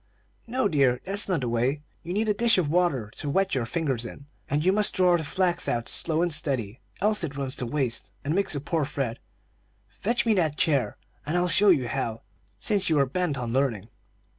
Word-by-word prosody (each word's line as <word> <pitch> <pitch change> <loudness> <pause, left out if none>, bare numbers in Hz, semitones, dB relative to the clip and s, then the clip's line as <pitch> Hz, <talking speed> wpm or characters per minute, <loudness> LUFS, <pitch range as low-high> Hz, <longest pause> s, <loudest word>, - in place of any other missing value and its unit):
"No, 245 -1 +1
dear, 135 -8 +2
that's 200 +1 +1
not 175 -6 +1
the 125 - -2
way; 125 +5 0 0.2
you 170 - -7
need 215 +4 0
a 210 - +3
dish 230 +1 +3
of 170 -6 +1
water 150 -11 +1
to 145 - -4
wet 195 +5 +1
your 125 -4 0
fingers 140 -6 -1
in, 140 +3 -9 0.2
and 150 +3 0
you 185 - +5
must 210 +1 +2
draw 180 -1 +4
the 165 - -1
flax 175 +3 0
out 120 -1 -1
slow 165 0 0
and 175 -2 0
steady, 130 -7 -2 0.2
else 210 +1 +2
it 140 -1 -4
runs 135 -1 -2
to 125 - -3
waste, 120 -7 -2
and 150 - 0
makes 195 -3 0
a - - -1
poor 160 +2 -1
thread. 135 -5 -3 0.7
Fetch 220 - -1
me 225 - +4
that 160 -7 +1
chair, 145 -5 +1 0.3
and 155 +4 -1
I'll 175 0 +2
show 200 +4 +5
you 140 -9 +4
how, 115 -1 -3 0.4
since 195 - +1
you 160 - +3
are 140 - +4
bent 155 +1 -1
on 120 -2 -3
learning." 120 -6 0
150 Hz, 215 wpm, -26 LUFS, 130-185 Hz, 0.7 s, you